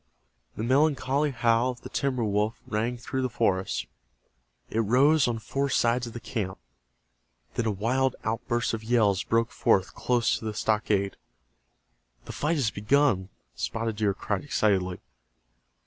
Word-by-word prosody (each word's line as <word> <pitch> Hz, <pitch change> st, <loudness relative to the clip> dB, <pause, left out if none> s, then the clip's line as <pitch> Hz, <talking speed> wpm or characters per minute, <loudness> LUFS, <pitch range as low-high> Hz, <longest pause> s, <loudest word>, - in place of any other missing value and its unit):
The 110 Hz, -, -4 dB
melancholy 140 Hz, +2 st, +2 dB
howl 120 Hz, -1 st, +2 dB
of 125 Hz, -1 st, -6 dB
the -, -, -9 dB
timber 130 Hz, -3 st, -1 dB
wolf 105 Hz, +1 st, 0 dB
rang 115 Hz, +3 st, -1 dB
through 130 Hz, +2 st, -3 dB
the 130 Hz, -, 0 dB
forest. 95 Hz, -5 st, 0 dB, 0.9 s
It 110 Hz, -, 0 dB
rose 130 Hz, +7 st, +4 dB
on 120 Hz, -1 st, -1 dB
four 135 Hz, +5 st, -2 dB
sides 120 Hz, -1 st, +2 dB
of 115 Hz, -, -9 dB
the 120 Hz, -, -6 dB
camp. 100 Hz, -6 st, -4 dB, 1.0 s
Then 115 Hz, -, -1 dB
a -, -, +2 dB
wild 125 Hz, +6 st, 0 dB
outburst 115 Hz, +2 st, -1 dB
of 110 Hz, -1 st, -4 dB
yells 110 Hz, -5 st, +2 dB
broke 115 Hz, 0 st, +1 dB
forth 95 Hz, -1 st, +2 dB
close 120 Hz, -2 st, +1 dB
to -, -, -9 dB
the 110 Hz, -1 st, -3 dB
stockade. 105 Hz, -3 st, 0 dB, 1.1 s
"The -, -, -7 dB
fight 155 Hz, +3 st, 0 dB
has 130 Hz, -8 st, +1 dB
begun!" 105 Hz, -3 st, +2 dB, 0.2 s
Spotted 115 Hz, -1 st, -3 dB
Deer 105 Hz, -3 st, +1 dB
cried, 100 Hz, -1 st, -2 dB
excitedly. 95 Hz, -9 st, 0 dB
115 Hz, 145 wpm, -27 LUFS, 105-130 Hz, 1.1 s, rose